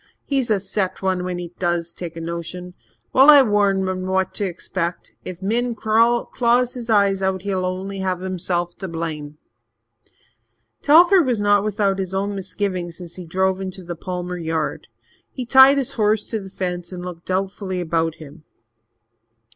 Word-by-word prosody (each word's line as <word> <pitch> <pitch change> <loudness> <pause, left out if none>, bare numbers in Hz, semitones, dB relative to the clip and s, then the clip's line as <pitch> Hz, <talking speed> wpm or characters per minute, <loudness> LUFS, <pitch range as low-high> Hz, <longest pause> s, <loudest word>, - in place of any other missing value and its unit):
"He's 270 -4 0
a 210 -2 +2
set 190 -1 -3
one 185 -1 0
when 180 -1 -3
he 175 -1 -7
does 175 -1 -1
take 170 -2 -7
a - - -5
notion. 170 +2 -6 0.4
Well, 270 +3 +7
I 290 -2 +9
warned 200 -4 +2
him 185 0 -3
what 190 0 0
to 205 - -1
expect. 175 -1 -4
If 185 0 -8
Min 235 +4 0
claws 235 +2 +2
his 240 -2 -7
eyes 200 -3 +3
out, 190 -1 -1
he'll 190 -2 -1
only 190 +2 -4
have 185 -2 -1
himself 175 -2 -2
to 190 - -4
blame." 155 -3 -5 1.4
Telford 345 +2 +6
was 240 -4 +1
not 205 -1 +3
without 200 -2 0
his 190 0 -3
own 200 +1 -1
misgivings 185 -3 -3
as 175 -2 -9
he 180 -2 -8
drove 190 +2 0
into 190 0 -6
the 175 0 -6
Palmer 180 +1 -5
yard. 160 -2 -3 0.4
He 255 - -5
tied 265 +3 +7
his 275 -1 0
horse 215 -4 +1
to 220 - -1
the 195 -1 -9
fence 180 -2 -4
and 180 -1 -7
looked 175 -2 -9
doubtfully 190 0 -2
about 165 -1 -1
him. 155 +1 -13
190 Hz, 170 wpm, -21 LUFS, 175-210 Hz, 1.4 s, I